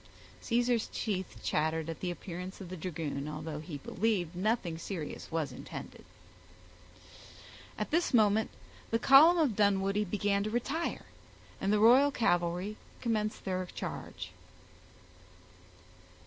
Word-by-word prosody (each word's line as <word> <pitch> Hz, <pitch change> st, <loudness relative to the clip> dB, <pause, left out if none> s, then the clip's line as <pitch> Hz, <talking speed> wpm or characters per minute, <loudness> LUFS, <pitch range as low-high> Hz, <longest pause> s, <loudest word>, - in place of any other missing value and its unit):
Caesar's 240 Hz, -1 st, +1 dB
teeth 190 Hz, -5 st, -3 dB
chattered 160 Hz, +1 st, 0 dB
at 165 Hz, -1 st, -5 dB
the 180 Hz, -, -2 dB
appearance 180 Hz, +1 st, -6 dB
of 190 Hz, -3 st, -8 dB
the 185 Hz, -, -5 dB
dragoon, 155 Hz, -5 st, -4 dB
although 150 Hz, 0 st, -5 dB
he 155 Hz, -1 st, -6 dB
believed 180 Hz, +2 st, -1 dB
nothing 190 Hz, -3 st, 0 dB
serious 170 Hz, -4 st, -6 dB
was 160 Hz, -3 st, -1 dB
intended. -, -, -9 dB, 1.7 s
At -, -, -3 dB
this 335 Hz, +3 st, +2 dB
moment 215 Hz, -2 st, +4 dB, 0.4 s
the 230 Hz, -, +2 dB
column 285 Hz, +9 st, +7 dB
of 290 Hz, -10 st, +2 dB
Dunwoodie 200 Hz, 0 st, +2 dB
began 200 Hz, +1 st, 0 dB
to 215 Hz, -, -2 dB
retire, 270 Hz, +9 st, -2 dB, 0.6 s
and 195 Hz, -, +1 dB
the 210 Hz, -, +4 dB
royal 245 Hz, +7 st, +7 dB
cavalry 180 Hz, -3 st, 0 dB, 0.2 s
commenced 215 Hz, -3 st, -1 dB
their 185 Hz, -1 st, -1 dB
charge. 90 Hz, -, -6 dB
195 Hz, 120 wpm, -31 LUFS, 170-225 Hz, 1.7 s, column